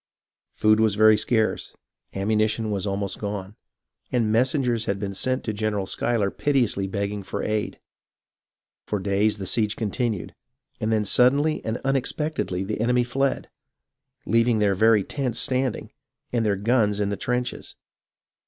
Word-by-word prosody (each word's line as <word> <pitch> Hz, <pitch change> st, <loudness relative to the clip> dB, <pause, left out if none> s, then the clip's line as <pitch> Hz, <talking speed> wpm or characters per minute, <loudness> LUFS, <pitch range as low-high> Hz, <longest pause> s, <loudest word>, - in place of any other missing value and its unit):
Food 110 Hz, 0 st, +3 dB
was 110 Hz, -2 st, +2 dB
very 110 Hz, 0 st, +6 dB
scarce, 110 Hz, +1 st, 0 dB, 0.4 s
ammunition 110 Hz, +2 st, 0 dB
was 100 Hz, 0 st, -2 dB
almost 100 Hz, 0 st, -2 dB
gone, 100 Hz, -1 st, -5 dB, 0.6 s
and 115 Hz, -3 st, +1 dB
messengers 125 Hz, -1 st, +1 dB
had 100 Hz, 0 st, -2 dB
been 100 Hz, -1 st, -4 dB
sent 130 Hz, +6 st, 0 dB
to 110 Hz, -, -3 dB
General 105 Hz, -2 st, -1 dB
Schuyler 105 Hz, 0 st, 0 dB
piteously 120 Hz, -9 st, +1 dB
begging 100 Hz, +1 st, -3 dB
for 95 Hz, -, -5 dB
aid. 105 Hz, -1 st, -2 dB, 1.1 s
For 105 Hz, -, -1 dB
days 100 Hz, +2 st, +1 dB
the 95 Hz, -, -5 dB
siege 105 Hz, +2 st, 0 dB
continued, 110 Hz, -3 st, -2 dB, 0.5 s
and 110 Hz, -, -1 dB
then 110 Hz, -1 st, +1 dB
suddenly 140 Hz, +8 st, +3 dB
and 110 Hz, +2 st, -2 dB
unexpectedly 135 Hz, -, -1 dB
the 105 Hz, +2 st, -3 dB
enemy 125 Hz, +1 st, +2 dB
fled, 135 Hz, +3 st, -1 dB, 0.8 s
leaving 115 Hz, +1 st, +2 dB
their 105 Hz, -2 st, +2 dB
very 110 Hz, +1 st, +4 dB
tents 125 Hz, -2 st, -3 dB
standing, 130 Hz, 0 st, 0 dB, 0.4 s
and 120 Hz, -2 st, +1 dB
their 105 Hz, -2 st, +1 dB
guns 105 Hz, 0 st, +1 dB
in 100 Hz, -1 st, 0 dB
the -, -, -1 dB
trenches. 125 Hz, +4 st, -3 dB
110 Hz, 145 wpm, -24 LUFS, 100-120 Hz, 1.1 s, very